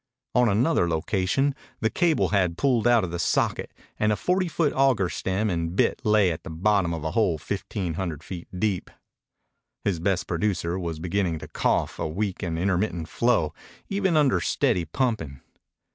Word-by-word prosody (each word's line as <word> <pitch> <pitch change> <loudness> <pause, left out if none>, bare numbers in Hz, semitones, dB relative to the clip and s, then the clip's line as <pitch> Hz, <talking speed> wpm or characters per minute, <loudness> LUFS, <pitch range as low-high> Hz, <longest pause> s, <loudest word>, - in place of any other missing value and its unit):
On 125 -1 +4
another 105 - +2
location 95 - +1 0.3
the 110 - 0
cable 170 -3 +2
had 90 -5 +1
pulled 120 -2 +2
out 120 -2 +5
of 90 - -3
the 85 - -4
socket 85 - 0 0.3
and 105 0 +3
a - - +2
forty 180 - 0
foot 160 -2 0
auger 130 -9 +3
stem 95 +5 -1
and 85 -2 -2
bit - - +2
lay 105 -4 +4
at 80 - -5
the - - -8
bottom 95 +2 +1
of 80 -2 -4
a 80 - -2
hole 90 -5 +2
fifteen 85 +3 -4
hundred 80 -3 -4
feet 90 -3 -7
deep. 100 -3 -1 0.9
His 95 -5 0
best 95 +1 0
producer 90 -1 -1
was 85 -3 -4
beginning 90 0 -1
to - - -8
cough - - 0
a - - -1
weak 95 +4 -3
and 85 -2 -2
intermittent 90 -2 -1
flow 115 -11 +1 0.4
even 195 -4 +1
under 135 - +3
steady 85 +1 +1
pumping. 90 - -2
95 Hz, 175 wpm, -25 LUFS, 85-110 Hz, 0.9 s, out